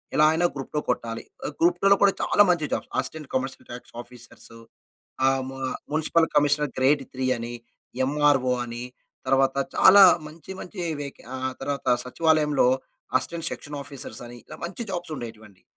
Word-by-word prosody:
ఎలా 155 - +5
అయినా 175 +2 +1
group 135 - -6
two - - +2
కొట్టాలి. 115 -2 -2 0.2
ఆ - - -1
గ్రూప్ 175 +1 +3
టూలో 200 0 +6
కూడా 200 -1 +5
చాలా - - +3
మంచి 170 -4 +2
jobs, - - -3
assistant 155 -3 -3
commercial 130 0 -3
tax 125 - -10
officers, 120 -1 -13 0.7
ఆహ్, 135 0 +2
ము 135 - -8 0.3
మ్యునిసిపల్ 160 +2 +3
కమిషనర్ 145 -1 +3
గ్రేడ్ 135 +2 +3
త్రీ 130 0 -2
అని, 120 +1 -6 0.5
ఎమ్‌ఆర్‌ఓ 140 -3 +2
అని, 120 0 -6 0.4
తరువాత 135 0 +2 0.2
చాలా 200 +1 +8 0.2
మంచి 160 +4 -12
మంచి 180 0 -8 0.2
వెకేన్ 140 -3 -8
ఆహ్, 130 0 -3
తర్వాత 140 0 -3 0.2
సచివాలయంలో 150 0 +2 0.5
అసిస్టెంట్ 165 +6 -2
సెక్షన్ 145 0 -7
ఆఫీసర్స్ 130 -4 -7
అని 120 0 -11
ఇలా 155 - -11
మంచి 180 +7 -5
జాబ్స్ 175 -3 -4
ఉండేటివి 115 -3 -8
అండి. 95 -2 -24
140 Hz, 160 wpm, -25 LUFS, 125-160 Hz, 0.7 s, చాలా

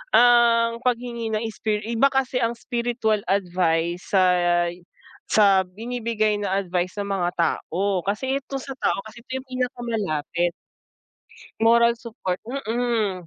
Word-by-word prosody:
ang 235 -1 +5
paghingi 235 -2 -1
ng 215 - -1
spir 210 -1 -2
iba 235 +4 +3
kasi 265 -2 0
ang 235 0 0
spiritual 235 -3 -1
advice 175 -2 0
sa 190 - +6 1.1
sa 200 -3 +5
binibigay 215 +2 -2
na 195 -1 0
advice 185 0 -2
ng 200 - -2
mga 175 -2 0
tao 180 +3 0
kasi 260 +8 -1
ito 275 +1 -5
sa 270 0 -6
tao - - +1
kasi 220 +2 -12
ito 260 +2 -5
yung 260 - -8
pinakamalapit. 220 - -2 1.1
Moral 235 +1 +5
support 215 -6 -5 0.3
mm. 220 -6 -1
220 Hz, 125 wpm, -23 LUFS, 190-240 Hz, 1.1 s, sa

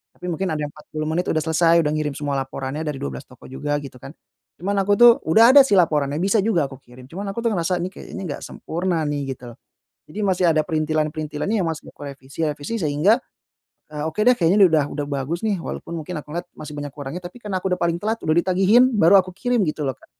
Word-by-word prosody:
Tapi 180 -1 -5
mungkin 190 +4 -2
ada 155 -3 -2
yang 145 - -4
40 155 0 -7
menit 175 +3 -1
udah 155 -1 0
selesai, 165 +1 +3
udah 150 - 0
ngirim 150 -2 -2
semua 145 -2 -2
laporannya 135 +3 -5
dari 150 - -2
12 70 - -6
toko - - -18
juga 145 +2 -2
gitu 130 -2 -10
kan. 140 +5 -11 0.4
Cuman 200 +3 -1
aku 200 +1 +2
tuh 240 +2 +9 0.2
udah 225 +9 +7
ada 280 - +9
sih 205 - +3
laporannya 150 -5 +2
bisa 200 +3 +3
juga 175 -10 +1
aku 135 - -11
kirim. 125 -1 -16
Cuman 195 +4 -5
aku 235 - -4
tuh 230 - +1
ngerasa, 180 -2 0
nih 185 - -4
kayaknya 195 - -9
enggak 155 -6 -5
sempurna 170 -1 -2
nih, 145 -2 -3
gitu 120 -1 -11
loh. 115 - -16 0.5
Jadi 155 - -11
masih 190 -3 +1
ada 155 - +2
perintilan-perintilannya 155 +4 -1
yang 165 - 0
masih 160 -1 -6
aku - - -11
revisi-revisi 145 +7 -4
sehingga, 160 +3 +3 0.7
eee, 150 -1 -5
oke 185 +7 -2
deh, 250 +3 +6
kayaknya 175 +3 +3
nih - - +4
udah 150 -2 +4
udah 145 -1 -3
bagus 140 +5 -3
nih. 215 -3 0
Walaupun 170 0 -6
mungkin 160 +2 -6
aku - - -25
ngelihat 175 +1 -4
masih 150 0 -9
banyak 145 -1 -6
kurangnya, 145 +4 -6
tapi 180 +7 -9
karena 205 -4 -3
aku 185 0 -1
udah 180 - -3
paling 170 0 +1
telat 220 +5 -2
udah 155 - +1
ditagihin, 195 +6 +5
baru 200 -2 +6
aku 185 -1 +1
kirim 245 +3 0
gitu 150 0 -3
loh 130 - -5
Kak. - - -20
160 Hz, 235 wpm, -22 LUFS, 145-190 Hz, 0.7 s, tuh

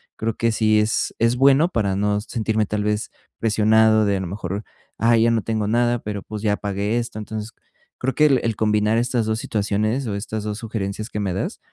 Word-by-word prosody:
Creo 110 0 -2
que 115 0 +1
sí 110 -1 +3
es 105 +1 0
es 115 +1 +3
bueno 135 +5 +5
para 100 - 0
no 105 0 +1
sentirme 110 -1 -1
tal 105 0 -2
vez 105 0 -1 0.3
presionado 110 0 +4
de, 100 -1 +1
a - - -2
lo 95 - -4
mejor, 100 +2 -4 0.3
ay, 115 0 +4
ya 115 - +4
no 115 - +1
tengo 110 -2 -1
nada, 120 +2 +2
pero 105 -2 -5
pues 105 -1 -7
ya 105 -1 +1
pagué 100 +3 -2
esto. 120 -2 -4
Entonces, 110 +1 -6 0.5
creo 130 +1 -1
que 150 - +4
el 135 -3 +3
el 115 -2 0
combinar 105 +1 +2
estas 120 -1 0
2 110 0 0
situaciones 110 +5 -1
o 100 - -2
estas 105 +1 -4
2 105 0 -3
sugerencias 110 -1 -4
que 105 - -4
me 95 -3 -1
das, 95 - -3
110 Hz, 215 wpm, -22 LUFS, 105-115 Hz, 0.5 s, bueno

